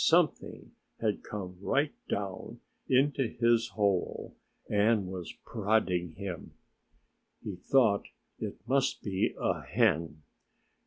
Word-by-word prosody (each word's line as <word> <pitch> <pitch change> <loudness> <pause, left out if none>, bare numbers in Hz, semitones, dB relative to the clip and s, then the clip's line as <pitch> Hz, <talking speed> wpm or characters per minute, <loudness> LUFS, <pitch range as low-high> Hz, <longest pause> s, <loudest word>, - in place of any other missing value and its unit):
Something 170 -1 +2 0.3
had 110 -3 0
come 95 -4 -6
right 140 +7 +1 0.2
down 100 -2 -4 0.3
into 135 0 +3
his 115 0 +2
hole 100 -4 0 0.3
and 105 0 +3
was 90 -2 -5
prodding 95 -6 +1
him. 90 +1 -6 0.9
He 100 - -4
thought 110 0 +3 0.3
it 105 - -6
must 135 +1 +1
be 95 -2 0
a - - 0
hen. 85 -9 +1
105 Hz, 105 wpm, -31 LUFS, 95-120 Hz, 0.9 s, into